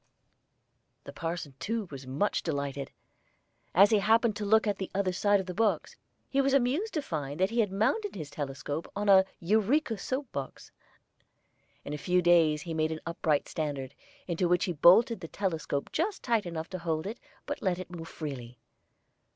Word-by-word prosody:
The - - -9
parson 165 -4 -4
too 220 +6 -2
was 135 -2 -8
much 145 +11 0
delighted. 140 -3 -3 0.9
As 200 +5 +7
he 215 - +5
happened 220 +2 +3
to 210 - -3
look 220 +2 +4
at 205 -2 -1
the 190 - -4
other 190 -2 +1
side 205 +2 +3
of 190 - -4
the 180 - -5
box, 220 +2 0 0.3
he 275 - +2
was 275 0 +2
amused 280 - +1
to 305 - 0
find 150 - -4
that 190 +3 +2
he 235 - 0
had 210 -4 +2
mounted 375 - 0
his 155 -5 -6
telescope 145 +2 -4
on 205 +1 -1
a 190 -1 +7
"Eureka 220 - +1
Soap" 265 0 -3
box. 135 -1 -6 1.1
In 145 - -5
a 150 - -4
few 180 +4 +2
days 160 -3 +4
he 165 - -5
made 160 0 0
an 160 - -4
upright 160 -3 0
standard, 140 -4 -4 0.3
into 175 0 0
which 175 0 +2
he 180 - -2
bolted 215 - +6
the 165 - -7
telescope 160 -7 -2
just 380 +5 -1
tight 230 -6 +1
enough 165 -1 -5
to 185 - -4
hold 160 -1 -2
it, 220 +4 -5 0.3
but 290 - -4
let 185 -3 +1
it 185 -1 -8
move 165 -2 -7
freely. 125 -6 -7
180 Hz, 185 wpm, -29 LUFS, 155-220 Hz, 1.1 s, As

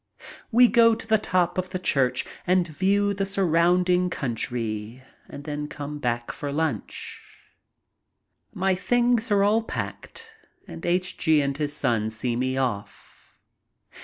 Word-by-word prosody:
We 245 +2 +7
go 230 -1 +5
to - - -10
the 220 -1 +3
top 180 -3 0
of 185 0 -3
the 185 - -3
church 135 -8 +1 0.2
and 180 -1 +3
view 200 +5 +1
the 200 0 -2
surrounding 180 -1 +2
country 115 -4 -4 0.3
and 145 - -9
then 150 0 -4
back 140 -6 -4
home - - -13
for 145 - -4
lunch. 155 +1 -3 1.3
My 190 +1 +1
things 240 +4 +1
are 200 -1 +3
all 215 +3 +3
packed 460 - -7 0.4
and - - -9
H. 180 +1 0
G. 160 -3 +4
and 140 -1 0
his 145 0 -2
son 110 -5 0
see 115 +2 -3
me 130 +2 -1
off. 120 -7 -5
175 Hz, 140 wpm, -25 LUFS, 135-195 Hz, 1.3 s, We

